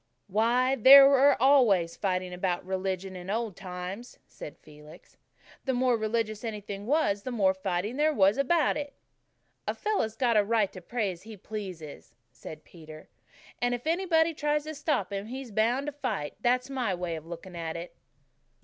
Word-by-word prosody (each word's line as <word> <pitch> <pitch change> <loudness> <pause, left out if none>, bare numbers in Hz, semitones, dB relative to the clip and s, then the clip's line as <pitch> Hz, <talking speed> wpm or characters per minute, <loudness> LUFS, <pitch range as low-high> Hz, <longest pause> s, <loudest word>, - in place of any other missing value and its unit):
"Why, 235 +6 +2
they 265 +5 +10
were 275 +1 +5
always 230 -11 +4
fighting 185 -2 -2
about 180 -1 -2
religion 190 0 -3
in 180 +1 -8
old 220 -2 -2
times," 185 +5 -8
said 150 - -10
Felix. 150 +2 -16 0.5
"The 265 -2 0
more 250 -1 +2
religious 220 -1 -2
anything 205 -2 -6
was 260 -9 +1
the 255 - -6
more 200 -6 +2
fighting 190 +4 -3
there 305 +1 +3
was 200 -2 +3
about 305 +3 +2
it." 290 -1 -5 0.7
"A - - -1
fellow's 405 - -1
got 240 -3 +2
a 210 - +5
right 215 -1 0
to 185 - -10
pray 215 +1 -2
as 175 -1 -11
he 220 0 -11
pleases," 185 -7 -8 0.2
said 155 0 -11
Peter, 155 -2 -13 0.5
"and 245 0 +1
if 245 - -9
anybody 330 -1 +2
tries 295 0 -1
to 310 +1 -6
stop 285 - -2
him 200 +1 -4
he's 255 0 -7
bound 235 +6 +1
to 295 - -3
fight. 245 - -4
That's 250 +2 +1
my 250 -8 -2
way 175 -1 -4
of 160 0 -9
looking 175 +2 -9
at 165 -1 -5
it." 170 +1 -9
215 Hz, 175 wpm, -28 LUFS, 185-260 Hz, 0.7 s, they